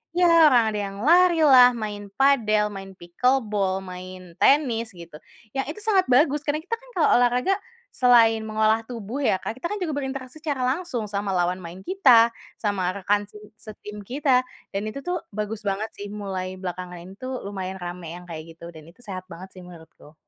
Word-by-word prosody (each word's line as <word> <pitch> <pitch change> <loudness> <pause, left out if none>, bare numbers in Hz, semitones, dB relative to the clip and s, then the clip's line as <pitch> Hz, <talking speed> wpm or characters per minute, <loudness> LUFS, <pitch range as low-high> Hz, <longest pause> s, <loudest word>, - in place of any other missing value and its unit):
ya 355 0 +4 0.2
orang 245 -4 +5
ada 210 - -3
yang 200 -1 -5
larilah, 315 -6 +6
main 210 -2 -5
padel, 225 -7 +3
main 195 -1 -8
pickle 250 +10 +1
ball, 195 -3 -1
main 185 -1 -9
tenis, 240 -6 +3
gitu. 170 -3 -11 0.4
Yang 270 - -1
itu - - -11
sangat 390 -4 +3
bagus 290 +3 +4
karena 300 +1 0
kita 420 +7 -2
kan - - -19
kalau - - +3
olahraga 250 +10 +2 0.4
selain 230 -3 +5
mengolah 220 +1 +2
tubuh 235 +3 -5
ya 190 - +2
Kak, 225 +6 -6
kita 340 - -2
kan 415 - -3
juga 315 -4 -2
berinteraksi 265 +1 -5
secara 290 -5 -2
langsung 260 -4 -2
sama 200 0 -3
lawan 180 +1 0
main 175 +2 -9
kita, 245 -11 +5 0.2
sama 200 -4 -1
rekan 205 +1 0
se 210 - -13 0.2
setim 210 -1 -10
kita, 260 +1 +2 0.3
dan 195 - -1
itu 275 - -7
tuh 355 -2 -2
bagus 210 +1 -4
banget 205 +2 -2
sih. 205 - -6
Mulai 190 -3 -5
belakangan 180 -1 -6
ini 185 +2 -11
tuh 255 +1 -5
lumayan 190 -1 -5
ramai 175 -1 -7
yang 180 - -12
kayak 155 -2 -6
gitu 170 0 -10
dan 155 -1 -13
itu 175 - -20
sehat 185 -3 -6
banget 185 +3 -10
sih - - -10
menurutku. 160 -3 -15
215 Hz, 185 wpm, -24 LUFS, 185-265 Hz, 0.4 s, larilah